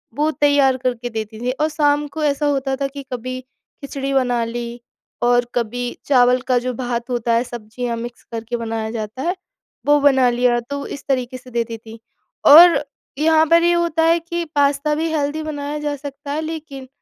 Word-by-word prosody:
वो 300 +2 +1
तैयार 285 -3 +3
करके 245 -1 -2
देती 220 -1 -6
थीं 250 +1 0
और 310 - +2
शाम 295 -1 +1
को 310 +2 -5
ऐसा 295 0 +1
होता 270 -2 0
था 275 0 -2
कि 280 0 -9
कभी 255 +1 -4 0.4
खिचड़ी 275 0 -4
बना 245 -3 +1
ली 235 +1 -6 0.4
और 245 0 +3
कभी 245 +1 -2
चावल 250 -2 +4
का 255 -1 +3
जो 255 +1 -3
भात 240 0 -3
होता 235 -1 0
है 230 +2 +3
सब्जियाँ 235 0 -5
मिक्स 240 +1 -7
करके 230 +1 -4
बनाया 225 -1 -3
जाता 220 +2 -5
है 350 +5 -1 0.5
वो 295 0 +5
बना 265 -3 +5
लिया, 240 0 +2
तो 280 +4 -6
इस 280 - -8
तरीके 255 -1 -1
से 255 0 -15
देती 230 -1 -2
थी। 225 0 -13 0.5
और 330 +2 +9 0.3
यहाँ 315 +1 +4
पर 335 0 +5
ये 345 - +4
होता 340 -2 +1
है 330 +1 +4
कि 340 +1 -4
पास्ता 285 +1 +2
भी 320 +2 -1
हेल्दी 305 +1 -1
बनाया 295 -1 -4
जा 295 -1 -2
सकता 280 0 -8
है 305 - -1
लेकिन 310 -4 -7
265 Hz, 190 wpm, -20 LUFS, 240-295 Hz, 0.5 s, और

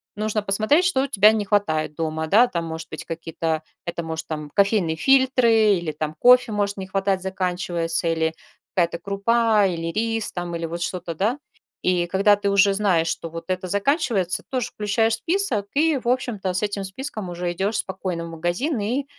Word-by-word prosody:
нужно 215 0 -1
посмотреть, 215 - +2
что 270 -7 +2
у - - -1
тебя 215 -5 +5
не 215 -2 -1
хватает 175 -7 0
дома, 160 0 -2
да. 220 +9 +5
Там 170 -8 -3
может 160 0 -6
быть 155 - -7
какие-то, 165 -1 -3 0.2
это 170 0 -3
может 160 0 -5
там 150 -2 -5
кофейные 200 -5 +2
фильтры 235 - +4
или 170 -3 -3
там 155 0 -4
кофе 250 -1 +6
может 205 -1 -1
не 190 -1 -6
хватать, 195 0 0
заканчивается 180 -3 -2
или 160 -1 0 0.4
какая-то 170 -2 +1
крупа 210 +2 +2
или 165 -2 -3
рис 225 +2 -1
там 175 -1 -4
или 170 0 -3
вот 170 +1 -5
что-то, 175 -1 -3
да. 210 - 0 0.5
И 180 -1 +1
когда 200 +3 +4
ты 200 0 -2
уже 200 0 +4
знаешь, 190 -5 +2
что 165 - -3
вот 165 +1 -8
это 185 0 -2
заканчивается 205 - 0
тоже 255 -4 -2
включаешь 220 +2 0
в - - 0
список 325 - 0
и 310 0 +3
в 240 - -9
общем-то 225 -7 -1
с 185 - -1
этим 205 -1 -2
списком 210 0 -5
уже 175 0 -3
идешь 195 +5 -1
спокойно 185 -3 -3
в - - -8
магазин 175 - -1
и 245 +7 -1
195 Hz, 190 wpm, -23 LUFS, 170-220 Hz, 0.5 s, кофе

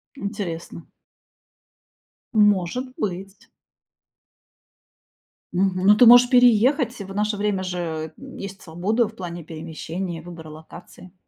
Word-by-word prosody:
Интересно. 195 -7 -6 1.5
Может 210 +3 +2
быть. 195 0 -6 2.0
Мгм. 185 0 0
Но 205 +1 +7
ты 245 - +6
можешь 245 +1 +8
переехать. 245 0 +3
Э, - - -6
в 195 - -9
наше 210 0 -1
время 205 -2 -1
же, 165 -3 -4
м, 270 0 -12
есть 195 -1 -8
свобода 200 +8 -1
в 220 - -13
плане 175 -3 -7
перемещения, 165 +2 -6
выбора 165 -2 -11
локации. 160 +3 -13
195 Hz, 110 wpm, -23 LUFS, 170-215 Hz, 2.0 s, можешь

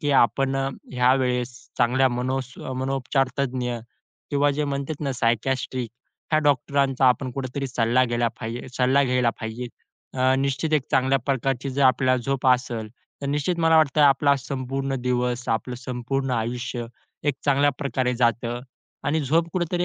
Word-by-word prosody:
की 145 -3 0
आपण 135 +2 +3 0.4
ह्या 125 0 +4
वेळेस 125 -2 0 0.3
चांगल्या 130 +2 +4
मनो 125 +2 -1 0.3
अ, 130 - -4
मनोपचार 135 +1 0
तज्ञ 125 -3 -1 0.5
किंवा 145 0 +3
जे 150 +1 -1
म्हणतात 140 +1 -3
ना 140 -3 -1
सायकियाट्रिक 125 +1 -1 0.4
ह्या 155 - +4
डॉक्टरांचा 140 -1 +2
आपण 130 +1 +1
कुठेतरी 135 +1 -3
सल्ला 120 0 +2
घ्यायला 120 -1 0
पाहिजे 120 +2 -5
सल्ला 130 +2 +3
घ्यायला 125 -2 +2
पाहिजे. 110 +2 -4 0.5
अ, 130 0 +3
निश्चित 140 +3 -1
एक 150 -4 +3
चांगल्या 135 0 +3
प्रकारची 135 0 -1
जर 140 +2 0
आपल्याला 130 -1 +4
झोप 135 +1 -1
असेल 125 -3 +1 0.3
तर - - -2
निश्चित 150 +5 -1
मला 165 0 +5
वाटतंय 155 -1 +4
आपला 140 0 +5
संपूर्ण 135 +1 -3
दिवस, 125 -1 -1
आपलं 115 +2 -1
संपूर्ण 130 +2 -3
आयुष्य 120 0 -2 0.4
एक 145 - +2
चांगल्या 145 0 +4
प्रकारे 130 -3 -1
जातं 120 0 0 0.4
आणि 155 +2 +1
झोप 165 +5 +1
कुठेतरी 175 0 0
130 Hz, 150 wpm, -24 LUFS, 125-140 Hz, 0.5 s, मला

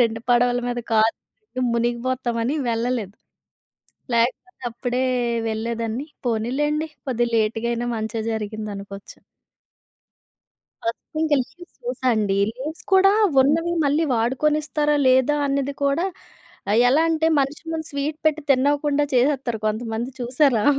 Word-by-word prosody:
రెండు 225 -1 +2
పడవల 245 0 +4
మీద 245 0 -2
కాలు 220 +1 +4 0.6
మునిగిపోతామని 240 +1 -1 0.2
వెళ్ళలేదు. 230 -3 -2 1.0
లేకపోతే 255 +11 -1
అప్పుడే 245 +2 -2 0.5
వెళ్ళేదాన్ని. 230 +3 -3 0.2
పోనీలెండి 290 +8 0 0.2
కొద్దిగ 240 -2 +1
లేట్‌గా 225 +1 +1
అయినా 240 +1 -2
మంచే 220 +1 -3
జరిగింది 215 -1 -4
అనుకోవచ్చు. 200 0 -10 1.7
ఫస్ట్ 230 +7 -5
ఇంక 315 -1 0
లీవ్స్ 350 +7 -15
చూసా 475 - -3
అండి. 205 -2 +1 0.2
లీవ్స్ 300 +6 -6
కూడా 390 +1 +6 0.3
ఉన్నవి 325 +5 +2
మళ్ళీ 295 +3 +2
వాడుకొనిస్తారా 295 +5 +1
లేదా? 260 +3 +4
అన్నది 280 0 0
కూడా 280 +6 +1 0.7
ఆహ్, 220 - +4
ఎలా 290 +6 +4
అంటే 320 0 +1
మనిషి 280 +3 -1
ముందు 320 -1 -3
స్వీట్ 285 +2 -2
పెట్టి 310 0 +2
తిన్ని‌వ్వకుండా 285 +2 +2
చేసేస్తారు 250 -2 +1
కొంతమంది 225 +3 -2
చూసారా! 245 -2 +2
255 Hz, 115 wpm, -23 LUFS, 230-295 Hz, 1.7 s, కూడా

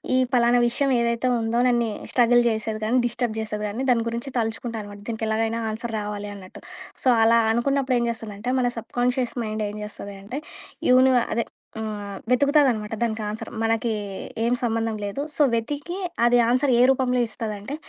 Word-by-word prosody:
ఈ - - +4 0.2
పలానా 240 0 +4
విషయం 275 +3 +1
ఏదైతే 235 +1 0
ఉందో, 225 +1 -1
నన్ను 240 -1 +2 0.2
స్ట్రగల్ 240 0 +5
జేసేది 220 -1 -1
గానీ, 235 +4 +2
డిస్టర్బ్ 235 -1 -2
జేసేది 215 -1 -3
గాని, 220 +6 -3
దానికి 230 -2 +3
గురించి 235 +4 -4
తలుచుకుంటా 230 0 -2
అనమాట. 205 0 -10
దీనికెలాగైనా 225 0 -1
ఆన్సర్ 225 +1 -5
రావాలి 205 0 -5
అన్నట్టు. 185 -2 -12 0.4
సో, - - 0 0.2
అలా 230 +1 +5
అనుకున్నప్పుడేం 255 +1 +1
జేస్తుందంటే, 225 0 -5
మన 250 - +2
సబ్‌కాన్షియస్ 245 +2 -1
మైండ్ 215 0 -3
ఏం 205 - -7
జేస్తది 200 -1 -7
అంటే, 250 +8 -5 0.5
యూను 255 +1 +6 0.2
అదే 235 +1 0 0.4
ఆహ్, 205 -2 -5
వెతుకుతదనమాట 250 -5 +3
దానికి 225 -1 -1
ఆన్సర్. 210 +1 -5
మనకి 225 0 +1 0.5
ఏం 235 +1 +2
సంబంధం 225 -1 0
లేదు. 200 +7 -3
సో, - - 0
వెతికి 290 +9 -2 0.3
అది 240 0 +5
ఆన్సర్ 255 +3 +2
ఏ - - +6
రూపంలో 250 -2 +1
ఇస్తదంటే, 215 +3 -5
230 Hz, 160 wpm, -24 LUFS, 220-245 Hz, 0.5 s, యూను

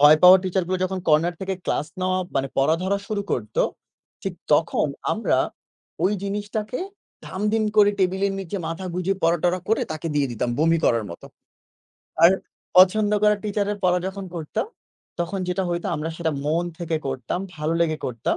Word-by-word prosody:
ভয় 150 +1 +8
পাওয়া 180 +1 +10
teacher 190 0 0
গুলো 185 0 0
যখন 190 0 -2
corner 160 +3 +4
থেকে 190 0 -2
class 150 - -1
নেওয়া 185 0 +1 0.2
মানে 135 0 0
পড়া 140 +4 +4
ধরা 195 +2 +1
শুরু 205 -1 -2
করতো 110 -3 0 0.6
ঠিক - - -3 0.2
তখন - - +3 0.3
আমরা - - +1 0.7
ওই 195 - +3
জিনিসটাকে 205 +3 -3 0.5
ধাম-ধিম 210 +3 0
করে 205 -1 +7
টেবিলের 190 +1 +1
নিচে 190 +1 -5
মাথা 165 +3 -4
গুঁজে 185 +2 0
পরা-টরা 175 +2 +2
করে 220 - +2
তাকে 155 +1 -5
দিয়ে 140 -3 +1
দিতাম 120 +1 -1
বমি 165 +2 +3
করার 115 -2 +3
মতো। 85 - -10 1.0
আর 170 - +9 0.5
পছন্দ 205 +3 +6
করা 210 0 +5
teacher 205 -1 -1
এর 205 - -6
পড়া 180 0 +4
যখন 195 +1 -5
পড়তাম, 160 - -3 0.5
তখন 175 +3 -2
যেটা 180 +2 0
হইতো 175 +2 -2
আমরা 155 +2 -3
সেটা 165 -2 -1
মন 165 +3 +1
থেকে 165 -2 -1
করতাম, 130 +5 -3 0.2
ভালো 155 +2 -1
লেগে 155 -2 +1
করতাম। 115 -2 -1
180 Hz, 170 wpm, -23 LUFS, 155-195 Hz, 1.0 s, পাওয়া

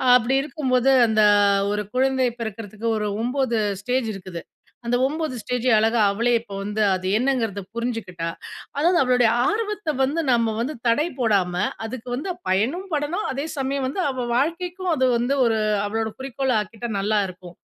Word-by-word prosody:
அப்பிடி 250 +2 +2
இருக்கும்போது, 265 -3 +1 0.2
அந்த 215 -1 +3 0.5
ஒரு 210 0 -1
குழந்தை 260 -1 +2
பிறக்கறதுக்கு 220 0 -5
ஒரு 210 -1 -1
9 250 -2 0 0.2
ஸ்டேஜ் 250 0 0
இருக்குது. 185 -3 -7 0.4
அந்த 240 +1 +1
9 305 -1 -2
ஸ்டேஜயும் 250 0 +1
அழகா 225 +1 +2
அவளே 235 +4 +1
இப்ப 225 - -17
வந்து 210 +2 -2
அது 185 0 -4
என்னங்கிறத 230 -5 0
புரிஞ்சுக்கிட்டா. 225 -8 -3 0.5
அதாவது 340 +5 +3
அவளுடைய 250 -2 +3 0.2
ஆர்வத்த 420 -6 -1
வந்து 290 +5 0
நம்ம 230 -2 +2
வந்து 255 +6 -2
தடை 295 +8 +3
போடாம, 200 -7 +2 0.3
அதுக்கு 245 +1 -7
வந்து 320 +9 -3 0.2
பயனும் 260 - 0
படணும், 305 +8 -1
அதே 275 +3 -3
சமயம் 270 0 -1
வந்து 275 - -4
அவ 255 -2 -3
வாழ்க்கைக்கும் 350 +6 -1
அது 260 -3 +2
வந்து 245 +4 0
ஒரு 225 -1 +2 0.3
அவளோட 220 +1 -2
குறிக்கோளா 265 -2 -1
ஆக்கிட்டா, 225 +3 -7
நல்லாயிருக்கும் 195 -4 -2
245 Hz, 150 wpm, -23 LUFS, 220-275 Hz, 0.5 s, அந்த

